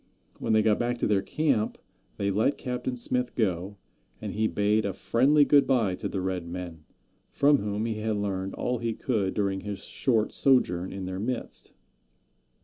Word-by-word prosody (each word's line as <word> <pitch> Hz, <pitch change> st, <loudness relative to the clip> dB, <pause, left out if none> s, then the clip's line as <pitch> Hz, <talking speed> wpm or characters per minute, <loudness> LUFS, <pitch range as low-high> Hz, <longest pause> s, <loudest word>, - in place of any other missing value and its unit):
When -, -, 0 dB
they 110 Hz, 0 st, +4 dB
got 105 Hz, -1 st, +3 dB
back 120 Hz, 0 st, 0 dB
to -, -, -1 dB
their 100 Hz, -2 st, +2 dB
camp 125 Hz, 0 st, 0 dB, 0.4 s
they 100 Hz, 0 st, 0 dB
let 110 Hz, +8 st, +1 dB
Captain 125 Hz, -1 st, -3 dB
Smith 125 Hz, 0 st, -1 dB
go, 95 Hz, -2 st, -1 dB, 0.4 s
and -, -, -5 dB
he 110 Hz, +1 st, +1 dB
bade 105 Hz, +1 st, +1 dB
a 100 Hz, -, -2 dB
friendly 140 Hz, +9 st, +3 dB
good 140 Hz, -2 st, +5 dB
by 115 Hz, -8 st, +2 dB
to -, -, -4 dB
the 95 Hz, -, -3 dB
red 90 Hz, -2 st, -3 dB
men, 85 Hz, -3 st, -7 dB, 0.4 s
from 145 Hz, 0 st, +4 dB
whom 105 Hz, +1 st, -2 dB
he 110 Hz, -2 st, -2 dB
had 110 Hz, 0 st, -1 dB
learned 95 Hz, -2 st, -3 dB
all 125 Hz, -1 st, -1 dB
he 115 Hz, -1 st, -2 dB
could 105 Hz, -7 st, -1 dB
during 100 Hz, -2 st, 0 dB
his 100 Hz, -1 st, -6 dB
short 115 Hz, -5 st, 0 dB
sojourn 95 Hz, -9 st, +2 dB
in 95 Hz, -1 st, -5 dB
their 95 Hz, 0 st, -4 dB
midst. 120 Hz, +3 st, -4 dB
105 Hz, 180 wpm, -27 LUFS, 95-125 Hz, 0.4 s, good